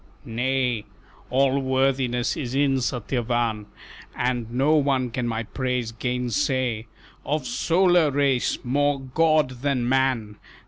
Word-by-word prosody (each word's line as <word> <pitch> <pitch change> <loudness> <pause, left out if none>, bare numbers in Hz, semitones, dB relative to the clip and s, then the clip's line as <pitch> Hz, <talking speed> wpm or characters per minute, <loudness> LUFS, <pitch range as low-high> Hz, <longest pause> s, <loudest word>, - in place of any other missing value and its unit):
"Nay, 125 -1 -1 0.4
All 135 +2 +2
worthiness 130 -2 0
is 130 -4 -4
in 140 -1 +2
Satyavan, 120 -3 -1 0.5
And 120 -2 -1
no 135 +5 +2
one 135 -5 +1
can 120 0 -2
my 115 0 -2
praise 125 -1 -2
gainsay: 125 0 -1 0.4
Of 150 +1 -2
solar 175 -7 +3
race 140 -3 +1
more 145 +2 +1
god 135 -1 +1
than 135 -4 0
man! 125 -5 0
130 Hz, 110 wpm, -24 LUFS, 120-140 Hz, 0.5 s, solar